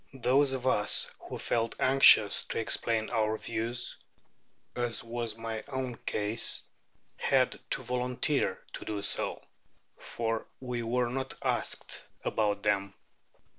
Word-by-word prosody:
Those 135 Hz, +2 st, +3 dB
of 130 Hz, -1 st, -3 dB
us 105 Hz, -5 st, +4 dB, 0.2 s
who -, -, -5 dB
felt 115 Hz, -1 st, -1 dB
anxious 130 Hz, -6 st, +7 dB
to -, -, -4 dB
explain 115 Hz, 0 st, -1 dB
our 110 Hz, -2 st, +1 dB
views 115 Hz, +2 st, -1 dB, 0.8 s
(as 120 Hz, -2 st, -1 dB
was 115 Hz, -1 st, -4 dB
my 115 Hz, -1 st, -5 dB
own 130 Hz, -3 st, -3 dB
case) 105 Hz, +2 st, 0 dB, 0.5 s
had -, -, +2 dB
to -, -, -2 dB
volunteer 125 Hz, +3 st, 0 dB
to -, -, -6 dB
do 105 Hz, -2 st, -3 dB
so, 100 Hz, -, -1 dB, 0.6 s
for 115 Hz, -1 st, -3 dB
we 125 Hz, -2 st, -4 dB
were 120 Hz, +1 st, 0 dB
not 130 Hz, +1 st, -4 dB
asked -, -, -1 dB, 0.2 s
about 105 Hz, -2 st, 0 dB
them. 100 Hz, -2 st, 0 dB
115 Hz, 125 wpm, -30 LUFS, 110-125 Hz, 0.8 s, anxious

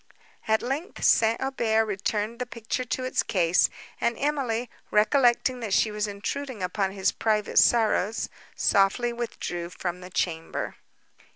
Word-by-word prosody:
At 220 Hz, 0 st, +2 dB
length 275 Hz, -, -4 dB
St. 225 Hz, 0 st, +4 dB
Aubert 230 Hz, -4 st, +1 dB
returned 210 Hz, +2 st, -2 dB
the 250 Hz, -, -3 dB
picture 235 Hz, +2 st, -4 dB
to 255 Hz, +1 st, -2 dB
its 255 Hz, -, +1 dB
case; 175 Hz, -3 st, +2 dB, 0.3 s
and 235 Hz, -1 st, +1 dB
Emily, 260 Hz, -5 st, -1 dB, 0.2 s
recollecting 245 Hz, +3 st, +3 dB
that 215 Hz, -5 st, -1 dB
she 220 Hz, -, +3 dB
was 210 Hz, 0 st, -1 dB
intruding 220 Hz, +3 st, -4 dB
upon 190 Hz, +2 st, 0 dB
his 195 Hz, -1 st, +1 dB
private 215 Hz, -2 st, +1 dB
sorrows, 220 Hz, -2 st, +3 dB, 0.3 s
softly 205 Hz, +5 st, +2 dB
withdrew 175 Hz, -7 st, -4 dB
from 180 Hz, 0 st, -5 dB
the 180 Hz, -, -9 dB
chamber. 165 Hz, -3 st, -2 dB
220 Hz, 135 wpm, -26 LUFS, 195-245 Hz, 0.3 s, St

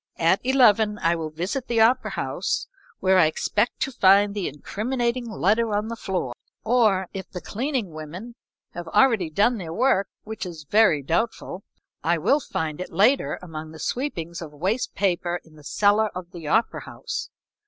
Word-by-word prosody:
At 170 Hz, +3 st, +3 dB
eleven 225 Hz, -5 st, +4 dB
I 170 Hz, -3 st, +1 dB
will 160 Hz, -2 st, -4 dB
visit 180 Hz, -, -3 dB
the 235 Hz, -1 st, +1 dB
opera 245 Hz, +3 st, +4 dB
house, -, -, -2 dB, 0.4 s
where 190 Hz, 0 st, +4 dB
I 160 Hz, -, +6 dB
expect 210 Hz, +8 st, -1 dB
to 270 Hz, -, 0 dB
find 200 Hz, -2 st, +5 dB
the 200 Hz, -3 st, -2 dB
incriminating 235 Hz, -, -2 dB
letter 215 Hz, +2 st, +1 dB
on 210 Hz, +2 st, -1 dB
the 230 Hz, -, -4 dB
floor, 185 Hz, -, -3 dB, 0.3 s
or 215 Hz, -5 st, +3 dB
if 190 Hz, -1 st, -6 dB
the 180 Hz, -, -6 dB
cleaning 240 Hz, -, -3 dB
women 160 Hz, +10 st, -8 dB, 0.4 s
have 175 Hz, -1 st, -7 dB
already 220 Hz, -3 st, +3 dB
done 210 Hz, +8 st, +2 dB
their 165 Hz, -4 st, -6 dB
work, 210 Hz, -1 st, +2 dB, 0.2 s
which 220 Hz, 0 st, -6 dB
is 170 Hz, -5 st, -7 dB
very 205 Hz, -9 st, +4 dB
doubtful, 180 Hz, -, -2 dB, 0.4 s
I 170 Hz, +2 st, +2 dB
will 275 Hz, -, +3 dB
find 160 Hz, -, -4 dB
it -, -, -6 dB
later 210 Hz, +11 st, +3 dB
among 160 Hz, -2 st, -8 dB
the -, -, -10 dB
sweepings 170 Hz, -, -3 dB
of 160 Hz, -3 st, -7 dB
waste 190 Hz, -, -2 dB
paper 175 Hz, -3 st, 0 dB
in 160 Hz, -, -20 dB
the 150 Hz, -, -16 dB
cellar 210 Hz, +6 st, +2 dB
of 180 Hz, -1 st, -8 dB
the 165 Hz, -4 st, -8 dB
opera 225 Hz, +9 st, +1 dB
house. -, -, -5 dB
200 Hz, 175 wpm, -24 LUFS, 170-230 Hz, 0.4 s, I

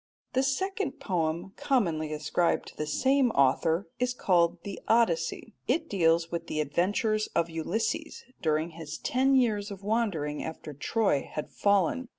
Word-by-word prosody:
The 260 Hz, -, +3 dB
second 375 Hz, +5 st, -1 dB
poem 175 Hz, -1 st, -2 dB
commonly 175 Hz, -, 0 dB
ascribed 155 Hz, +3 st, 0 dB
to -, -, -17 dB
the 155 Hz, -, -3 dB
same 265 Hz, -, +3 dB
author 160 Hz, +6 st, +2 dB
is 250 Hz, 0 st, 0 dB
called 175 Hz, -5 st, +2 dB
the 200 Hz, -1 st, -6 dB
Odyssey. 225 Hz, -2 st, +1 dB
It 315 Hz, +6 st, +1 dB
deals 165 Hz, -3 st, +2 dB
with 170 Hz, -1 st, -4 dB
the 155 Hz, -, -2 dB
adventures 205 Hz, -, +1 dB
of 170 Hz, 0 st, +1 dB
Ulysses 220 Hz, -, -2 dB, 0.2 s
during 155 Hz, 0 st, 0 dB
his 160 Hz, -1 st, -7 dB
ten 265 Hz, +2 st, +2 dB
years 215 Hz, -5 st, +2 dB
of 200 Hz, -1 st, -9 dB
wandering 195 Hz, -10 st, -1 dB
after 155 Hz, -1 st, -7 dB
Troy 145 Hz, -, 0 dB
had 150 Hz, -, -5 dB
fallen. 200 Hz, +5 st, +2 dB
185 Hz, 150 wpm, -28 LUFS, 160-235 Hz, 0.2 s, The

